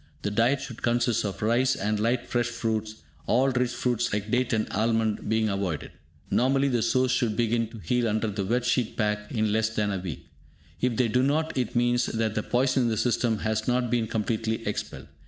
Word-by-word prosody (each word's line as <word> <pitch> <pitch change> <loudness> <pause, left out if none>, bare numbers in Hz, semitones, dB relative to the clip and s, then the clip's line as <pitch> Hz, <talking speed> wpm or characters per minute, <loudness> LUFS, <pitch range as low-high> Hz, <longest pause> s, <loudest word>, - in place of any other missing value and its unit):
The 105 - -1
diet 120 +6 +2
should 125 -4 -8
consist 120 -1 +1
of 100 -1 -4
rice, 125 +4 +3
and 105 +1 -1
light 120 +3 0
fresh 120 -1 0
fruits, 110 -2 -3 0.2
all 130 +4 +3
rich 125 -1 +1
fruits 120 -2 -1
like 105 +1 -2
date 125 +1 +1
and 110 -2 +1
almond 110 -1 0
being 110 0 +2
avoided. 100 -6 -2 0.4
Normally 135 +2 +3
the 120 -3 +1
sores 130 +3 +2
should 115 -4 0
begin 115 -1 +1
to 115 - -11
heal 120 +5 0
under 110 +1 0
the 100 -1 -2
"Wet 120 +5 0
Sheet 125 -3 0
Pack" 105 -1 -1
in 110 -3 0
less 110 +1 +2
than 105 -2 -1
a 95 - -2
week; 85 -2 -6 0.6
if 125 -2 +1
they 125 - +3
do 125 +3 +2
not, 155 +4 0
it 125 -3 -2
means 120 0 +2
that 110 -1 -1
the 110 - -1
poison 130 +4 +1
in 120 - +2
the 110 - -1
system 115 0 +1
has 110 0 -1
not 125 -1 +1
been 120 -2 +1
completely 110 +1 -2
expelled. 105 - -4
115 Hz, 210 wpm, -26 LUFS, 110-125 Hz, 0.6 s, rice